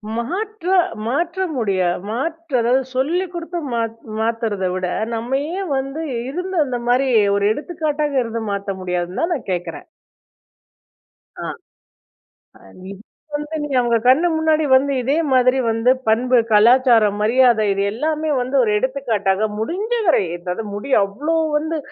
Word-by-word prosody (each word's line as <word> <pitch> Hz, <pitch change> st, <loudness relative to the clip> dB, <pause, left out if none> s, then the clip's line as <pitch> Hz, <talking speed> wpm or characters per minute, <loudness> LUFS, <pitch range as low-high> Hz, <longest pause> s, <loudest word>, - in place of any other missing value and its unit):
மாற்ற 370 Hz, -, -3 dB, 0.3 s
மாற்ற 340 Hz, +10 st, -1 dB
முடியா 190 Hz, -6 st, +1 dB, 0.2 s
மாற்ற 325 Hz, +8 st, -4 dB
அதாவது 250 Hz, +3 st, +2 dB
சொல்லிக் 340 Hz, +7 st, 0 dB
குடுத்து 345 Hz, 0 st, -4 dB
மா 230 Hz, -, +1 dB, 0.4 s
மாத்துறத 220 Hz, -4 st, -1 dB
விட 185 Hz, -1 st, -2 dB, 0.3 s
நம்ம 245 Hz, +4 st, -1 dB, 0.2 s
ஏன் 385 Hz, -5 st, -4 dB
வந்து 275 Hz, +4 st, -4 dB, 0.3 s
இருந்த 360 Hz, +6 st, -4 dB
அந்த 250 Hz, -3 st, -3 dB
மாரி 260 Hz, +2 st, +2 dB, 0.3 s
ஒரு 200 Hz, 0 st, +1 dB
எடுத்துக்காட்டாக 300 Hz, -1 st, -2 dB
இருந்து 230 Hz, 0 st, -4 dB
மாத்த 200 Hz, -1 st, -4 dB
முடியாதுன்னு 180 Hz, -, -3 dB
தான் 340 Hz, +1 st, +1 dB
நான் 245 Hz, -, -8 dB
கேட்கறேன். 175 Hz, -1 st, -5 dB, 1.6 s
ஆ. -, -, -4 dB, 1.5 s
இது 200 Hz, 0 st, -10 dB, 0.4 s
வந்து 295 Hz, +2 st, -5 dB
நீ 295 Hz, -, -4 dB
அவங்க 235 Hz, -1 st, +2 dB
கண்ணு 300 Hz, +8 st, +5 dB
முன்னாடி 315 Hz, -1 st, +2 dB
வந்து 280 Hz, +2 st, +3 dB
இதே 270 Hz, +5 st, +1 dB, 0.2 s
மாதிரி 255 Hz, +1 st, +4 dB
வந்து 225 Hz, +2 st, +2 dB, 0.2 s
பண்பு, 250 Hz, +3 st, +3 dB, 0.2 s
கலாச்சாரம், 225 Hz, -1 st, +5 dB
மரியாதை 235 Hz, -1 st, +4 dB
இது 195 Hz, 0 st, -1 dB
எல்லாமே 310 Hz, +6 st, -1 dB
வந்து 255 Hz, +3 st, -1 dB
ஒரு 215 Hz, -, +1 dB
எடுத்துக்காட்டாக 220 Hz, -6 st, 0 dB
முடிஞ்ச 375 Hz, -, -3 dB
வரை, 325 Hz, -, +4 dB, 0.2 s
அதாவது 180 Hz, +5 st, -4 dB
முடி 210 Hz, +7 st, -6 dB
அவ்வளோ 290 Hz, +12 st, -2 dB, 0.2 s
வந்து 315 Hz, +2 st, -1 dB
255 Hz, 135 wpm, -20 LUFS, 220-315 Hz, 1.6 s, கண்ணு